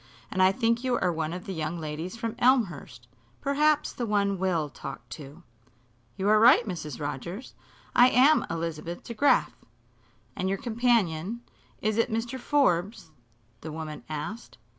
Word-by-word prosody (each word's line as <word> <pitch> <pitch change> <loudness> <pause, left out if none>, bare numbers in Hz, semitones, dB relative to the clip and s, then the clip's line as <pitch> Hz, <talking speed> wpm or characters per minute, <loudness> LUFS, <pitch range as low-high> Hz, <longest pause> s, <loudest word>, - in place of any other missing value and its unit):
"And 185 - 0
I 185 0 +6
think 230 +2 0
you 250 -2 +1
are 180 -2 +1
one 160 -1 -2
of 180 +1 -6
the 195 - -5
young 160 0 -3
ladies 160 +6 -5
from 230 -1 -3
Elmhurst 175 - +1 0.3
perhaps 300 +2 +2
the 240 - -3
one 200 -2 +1
Will 175 -5 0
talked - - -9
to." 150 +3 -10 0.7
"You 190 - -1
are 215 0 +5
right, 235 +1 +6
Mrs. 155 - -5
Rogers. 175 - -5 0.4
I 245 +1 +7
am 270 +5 +5
Elizabeth 165 0 -4
DeGraf." 245 +5 +2 0.8
"And 185 - -1
your 195 - 0
companion 230 -4 0 0.4
is 215 0 +1
it 230 - +2
Mr. 230 +3 -2
Forbes?" 205 - +1 0.5
the 160 - -6
woman 155 -1 -6
asked. 155 +10 -6
195 Hz, 150 wpm, -27 LUFS, 165-235 Hz, 0.8 s, I